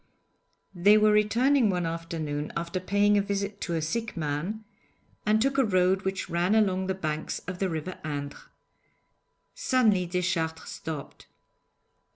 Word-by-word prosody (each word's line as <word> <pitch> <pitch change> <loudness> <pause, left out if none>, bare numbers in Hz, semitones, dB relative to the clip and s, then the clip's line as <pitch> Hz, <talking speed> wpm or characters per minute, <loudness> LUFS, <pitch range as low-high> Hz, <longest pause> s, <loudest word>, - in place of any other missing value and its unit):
They 200 +4 +5
were 215 0 +5
returning 230 +4 +3
one 180 -2 0
afternoon 165 -3 -4
after 170 +2 -3
paying 205 +2 +3
a - - +3
visit 200 0 -3
to 170 - -2
a 160 - -1
sick 225 +5 -3
man 165 +8 -3 0.6
and 215 +1 +4
took 270 +3 +1
a - - +5
road 185 -3 +2
which 190 -1 -3
ran 175 +5 +1
along 190 -3 +2
the 190 - -1
banks 155 -4 -3
of 180 0 -5
the 195 - 0
river 165 +2 -5
Indre. 145 -2 -4 1.1
Suddenly 235 - +2
Deschartres 170 -2 -2
stopped. 155 -4 -7
185 Hz, 145 wpm, -27 LUFS, 165-210 Hz, 1.1 s, They